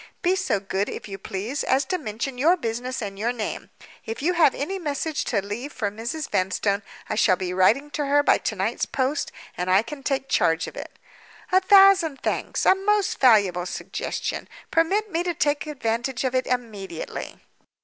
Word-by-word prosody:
"Be 365 Hz, +1 st, +3 dB
so 205 Hz, -, 0 dB
good, 195 Hz, +1 st, -2 dB
if -, -, -7 dB
you 195 Hz, -1 st, -7 dB
please, 205 Hz, +9 st, -4 dB
as 265 Hz, +1 st, +2 dB
to 365 Hz, +6 st, -2 dB
mention 245 Hz, 0 st, -4 dB
your 335 Hz, +7 st, +4 dB
business 245 Hz, -1 st, -3 dB
and 195 Hz, -1 st, -6 dB
your 230 Hz, +3 st, +1 dB
name. 230 Hz, -3 st, -5 dB, 0.3 s
If 225 Hz, +4 st, -6 dB
you 355 Hz, +3 st, +2 dB
have 330 Hz, -6 st, +4 dB
any 380 Hz, +8 st, -3 dB
message 300 Hz, -1 st, -2 dB
to 200 Hz, -4 st, -1 dB
leave 240 Hz, +8 st, -5 dB
for 210 Hz, -7 st, -2 dB
Mrs. 235 Hz, +9 st, -4 dB
Vanstone, 195 Hz, +2 st, 0 dB, 0.3 s
I -, -, -2 dB
shall 210 Hz, -3 st, +4 dB
be 180 Hz, -1 st, -4 dB
writing 230 Hz, +11 st, +3 dB
to 295 Hz, -1 st, -2 dB
her 290 Hz, +1 st, +4 dB
by -, -, +4 dB
to 220 Hz, -, -2 dB
night's 200 Hz, +4 st, -1 dB
post, 270 Hz, +3 st, -1 dB, 0.2 s
and 180 Hz, +1 st, -3 dB
I 190 Hz, +3 st, +5 dB
can 290 Hz, +3 st, -8 dB
take 270 Hz, -1 st, -1 dB
charge 165 Hz, -6 st, +2 dB
of -, -, -9 dB
it." -, -, -8 dB, 0.5 s
"A 375 Hz, +1 st, +5 dB
thousand 385 Hz, -6 st, +6 dB
thanks! -, -, -1 dB
A -, -, +7 dB
most 405 Hz, +1 st, 0 dB
valuable 200 Hz, -8 st, +4 dB
suggestion. 175 Hz, -, -4 dB, 0.2 s
Permit 390 Hz, +6 st, +1 dB
me 335 Hz, 0 st, 0 dB
to 350 Hz, -1 st, -2 dB
take 290 Hz, +1 st, 0 dB
advantage 240 Hz, -2 st, -2 dB
of 260 Hz, -1 st, 0 dB
it 255 Hz, 0 st, 0 dB
immediately." 210 Hz, -9 st, -4 dB
255 Hz, 190 wpm, -24 LUFS, 205-305 Hz, 0.5 s, A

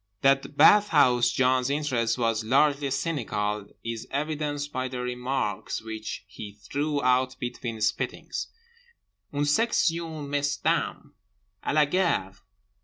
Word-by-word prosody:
That 135 Hz, +1 st, +2 dB
Bathhouse 145 Hz, -9 st, +6 dB
John's 130 Hz, +1 st, +2 dB
interest 135 Hz, -6 st, 0 dB
was 115 Hz, -2 st, 0 dB
largely 140 Hz, +4 st, +2 dB
cynical 105 Hz, -9 st, -2 dB, 0.2 s
is 115 Hz, -1 st, -5 dB
evidenced 145 Hz, 0 st, -3 dB
by 130 Hz, 0 st, -1 dB
the 125 Hz, -1 st, -5 dB
remarks 125 Hz, -2 st, -2 dB
which 110 Hz, -1 st, -6 dB
he 105 Hz, -1 st, -9 dB
threw 145 Hz, +7 st, -2 dB
out 130 Hz, 0 st, +2 dB
between 120 Hz, -2 st, -5 dB
spittings—"Une 465 Hz, -, -5 dB
section 165 Hz, -3 st, +1 dB
mesdames!" 145 Hz, 0 st, -1 dB, 0.5 s
"_A -, -, -1 dB
la 155 Hz, -1 st, +5 dB
gare! 150 Hz, -, 0 dB
135 Hz, 110 wpm, -26 LUFS, 120-150 Hz, 0.5 s, Bathhouse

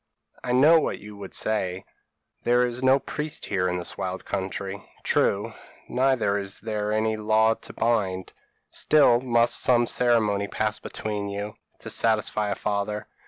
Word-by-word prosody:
p> -, -, -6 dB
"'I -, -, +2 dB
know 155 Hz, +6 st, +6 dB
what -, -, -2 dB
you 105 Hz, 0 st, -11 dB
would 100 Hz, -2 st, -7 dB
say; 95 Hz, -4 st, -1 dB, 0.6 s
there 120 Hz, +1 st, +3 dB
is 120 Hz, +1 st, -3 dB
no 130 Hz, +1 st, +5 dB
priest 150 Hz, +2 st, -4 dB
here 95 Hz, -3 st, 0 dB
in 90 Hz, -, -1 dB
this 90 Hz, -, -5 dB
wild 95 Hz, 0 st, -4 dB
country: 95 Hz, 0 st, -4 dB, 0.2 s
true; -, -, +1 dB, 0.3 s
neither 125 Hz, -6 st, +1 dB
is 100 Hz, -1 st, -3 dB
there 105 Hz, -1 st, -3 dB
any 110 Hz, 0 st, +1 dB
law 110 Hz, +1 st, +3 dB
to -, -, -11 dB
bind; 100 Hz, -6 st, -1 dB, 0.4 s
still 135 Hz, -6 st, +4 dB
must 120 Hz, -2 st, +2 dB
some 120 Hz, -1 st, +4 dB
ceremony 110 Hz, -5 st, +2 dB
pass 110 Hz, +1 st, -2 dB
between 105 Hz, -2 st, -4 dB
you, 100 Hz, +1 st, -5 dB, 0.2 s
to -, -, -7 dB
satisfy 105 Hz, -1 st, +1 dB
a 100 Hz, -, -1 dB
father. 105 Hz, 0 st, -2 dB
110 Hz, 160 wpm, -25 LUFS, 100-120 Hz, 0.6 s, know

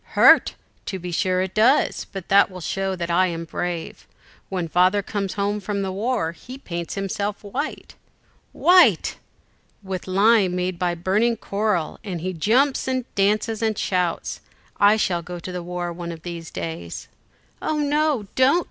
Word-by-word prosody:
"Hurt! -, -, +6 dB, 0.3 s
to 190 Hz, -, -3 dB
be 180 Hz, -1 st, -6 dB
sure 185 Hz, +1 st, +1 dB
it 190 Hz, -, -5 dB
does, 235 Hz, +7 st, +3 dB
but 195 Hz, -3 st, -7 dB
that 200 Hz, +1 st, +6 dB
will 185 Hz, -1 st, -9 dB
show 190 Hz, +2 st, -2 dB
that 170 Hz, -1 st, -3 dB
I 185 Hz, +2 st, +4 dB
am 165 Hz, -1 st, -4 dB
brave. 170 Hz, 0 st, -5 dB, 0.4 s
When 180 Hz, -3 st, -2 dB
Father 185 Hz, +5 st, +3 dB
comes 200 Hz, -2 st, -3 dB
home 205 Hz, +1 st, -1 dB
from 200 Hz, 0 st, -3 dB
the 190 Hz, -, -2 dB
war, 205 Hz, -3 st, -1 dB
he 250 Hz, +10 st, -11 dB
paints 170 Hz, -9 st, -5 dB
himself 200 Hz, +1 st, -3 dB
white." 265 Hz, +9 st, -5 dB, 0.6 s
"White!" 360 Hz, +1 st, +4 dB, 0.7 s
"With 190 Hz, -2 st, -5 dB
lime 195 Hz, -1 st, +4 dB
made 180 Hz, -1 st, -2 dB
by 175 Hz, -1 st, 0 dB
burning 210 Hz, +7 st, +1 dB
coral, 200 Hz, -6 st, -1 dB
and 185 Hz, -5 st, -4 dB
he 185 Hz, +3 st, -3 dB
jumps 250 Hz, -, +2 dB
and 255 Hz, -2 st, -1 dB
dances 210 Hz, +2 st, +1 dB
and 220 Hz, -2 st, 0 dB
shouts: 180 Hz, -2 st, -1 dB, 0.4 s
I 205 Hz, +1 st, +6 dB
shall 175 Hz, -5 st, 0 dB
go 180 Hz, +1 st, -7 dB
to 175 Hz, +2 st, -7 dB
the 180 Hz, -1 st, -4 dB
war 175 Hz, 0 st, -4 dB
one 170 Hz, 0 st, -6 dB
of 165 Hz, -1 st, -10 dB
these 170 Hz, -2 st, -6 dB
days." 85 Hz, 0 st, -6 dB, 0.5 s
"Oh 310 Hz, -, -1 dB
no, 295 Hz, -5 st, +1 dB
don't!" 265 Hz, +6 st, +4 dB
190 Hz, 165 wpm, -23 LUFS, 175-215 Hz, 0.7 s, Hurt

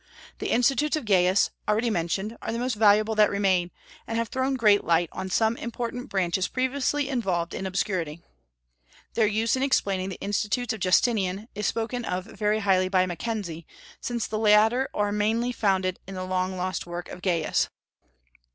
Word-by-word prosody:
The -, -, -3 dB
Institutes 270 Hz, +5 st, +2 dB
of 310 Hz, -, -4 dB
Gaius, 185 Hz, -1 st, +3 dB, 0.2 s
already 225 Hz, +2 st, +2 dB
mentioned, 195 Hz, +4 st, -2 dB
are -, -, -3 dB
the 230 Hz, -, -2 dB
most 250 Hz, +1 st, -1 dB
valuable 215 Hz, 0 st, +4 dB
that 215 Hz, -1 st, +4 dB
remain, 190 Hz, -3 st, +1 dB, 0.4 s
and 225 Hz, -, -2 dB
have 230 Hz, -1 st, -1 dB
thrown 260 Hz, +1 st, 0 dB
great 210 Hz, -5 st, +4 dB
light 170 Hz, 0 st, +2 dB
on 190 Hz, -, -5 dB
some 220 Hz, +4 st, +2 dB
important 245 Hz, +2 st, -5 dB
branches 185 Hz, -1 st, 0 dB
previously 275 Hz, +2 st, 0 dB
involved 190 Hz, -11 st, -1 dB
in 190 Hz, -, -3 dB
obscurity. 180 Hz, -4 st, -2 dB, 0.9 s
Their 220 Hz, -2 st, +3 dB
use 220 Hz, +3 st, +1 dB
in 260 Hz, -, -2 dB
explaining 195 Hz, -8 st, +1 dB
the 190 Hz, -, -7 dB
Institutes 210 Hz, +4 st, -1 dB
of 220 Hz, -, -7 dB
Justinian 195 Hz, +2 st, +1 dB
is 210 Hz, 0 st, -2 dB
spoken 235 Hz, +2 st, -2 dB
of 180 Hz, -3 st, -2 dB
very 215 Hz, 0 st, -1 dB
highly 185 Hz, -2 st, +2 dB
by 185 Hz, -1 st, +3 dB
Mackenzie, 175 Hz, -3 st, -4 dB, 0.3 s
since 235 Hz, -3 st, -2 dB
the 215 Hz, -, -3 dB
latter 220 Hz, +4 st, +4 dB
are 205 Hz, 0 st, +1 dB
mainly 220 Hz, +4 st, +1 dB
founded 190 Hz, -5 st, 0 dB
on 195 Hz, -, -7 dB
the 185 Hz, -, -4 dB
long 185 Hz, 0 st, -1 dB
lost 185 Hz, 0 st, -3 dB
work 175 Hz, 0 st, -6 dB
of 180 Hz, -, -9 dB
Gaius. 170 Hz, -5 st, +1 dB
210 Hz, 170 wpm, -26 LUFS, 185-230 Hz, 0.9 s, valuable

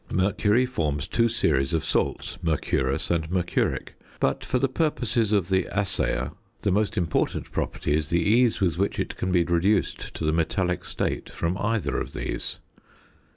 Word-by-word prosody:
Mercury 105 Hz, +5 st, +2 dB
forms 75 Hz, -, -2 dB
two 115 Hz, 0 st, +2 dB
series 70 Hz, -, +1 dB
of 80 Hz, -, -1 dB
salts, -, -, -1 dB
mercurous 70 Hz, -5 st, 0 dB
and 80 Hz, -2 st, 0 dB
mercuric, 90 Hz, -1 st, 0 dB, 0.3 s
but -, -, +1 dB
for 130 Hz, -, 0 dB
the 135 Hz, +2 st, +2 dB
purposes 125 Hz, -7 st, 0 dB
of 100 Hz, -4 st, +2 dB
the 95 Hz, 0 st, +2 dB
assayer 100 Hz, -2 st, 0 dB, 0.3 s
the 100 Hz, -, +2 dB
most 105 Hz, +2 st, +1 dB
important 85 Hz, -3 st, 0 dB
property 75 Hz, -, -1 dB
is 75 Hz, -1 st, -1 dB
the 85 Hz, -, +2 dB
ease 115 Hz, +4 st, +3 dB
with 90 Hz, -3 st, +1 dB
which 100 Hz, -, 0 dB
it -, -, -2 dB
can 95 Hz, -, -2 dB
be 90 Hz, -1 st, +4 dB
reduced 85 Hz, +5 st, +1 dB
to -, -, -5 dB
the 75 Hz, -, +3 dB
metallic 90 Hz, +3 st, 0 dB
state -, -, -2 dB
from 85 Hz, +2 st, -2 dB
either 115 Hz, -2 st, 0 dB
of -, -, -5 dB
these. -, -, -3 dB
95 Hz, 165 wpm, -26 LUFS, 80-110 Hz, 0.3 s, be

